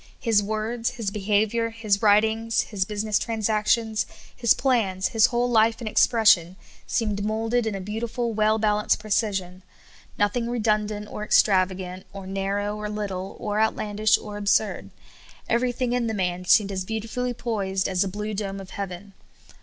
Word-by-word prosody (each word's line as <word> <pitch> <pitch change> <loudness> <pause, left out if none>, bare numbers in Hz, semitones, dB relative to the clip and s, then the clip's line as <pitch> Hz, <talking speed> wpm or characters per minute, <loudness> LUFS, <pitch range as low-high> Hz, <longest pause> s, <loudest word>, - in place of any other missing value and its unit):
His 225 -4 +3
words, 220 +3 -2
his 215 -4 -2
behavior, 215 +3 +1
his 220 -3 -1
writings, 220 +2 +3
his 195 -3 -2
business 210 +1 -1
transactions, 220 0 0 0.3
his 235 -2 +3
plans, 215 -8 +1
his 225 -1 +4
whole 240 0 0
life 225 -1 +3
and 235 - -6
expression, 210 -6 +4 0.3
seemed 210 -3 -1
moulded 225 +2 0
in 215 - -2
a 195 - -5
beautiful, 225 +4 -3
well 215 0 +2
balanced 210 -1 +1
precision; 195 -4 -2 0.6
noth 205 +1 +1
ing 235 -1 -1
redundant, 210 -3 -1
or 210 - -6
extravagant, 185 -3 +1
or 195 -1 -8
narrow, 195 +2 -2
or 210 0 -5
little, 195 -3 -5
or 210 0 -2
outlandish, 215 -1 +2
or 210 -1 -8
absurd. 205 +1 0 0.6
Everything 245 +1 0
in 245 -2 0
the 220 - -2
man 180 -2 -2
seemed 200 +1 +4
as 190 -1 -3
beautifully 230 +4 -3
poised 200 -5 -2
as 185 -2 0
the 195 - +2
blue 210 +3 -4
dome 195 -1 -4
of 190 -1 -10
heaven. 195 0 -6
210 Hz, 155 wpm, -24 LUFS, 200-225 Hz, 0.6 s, his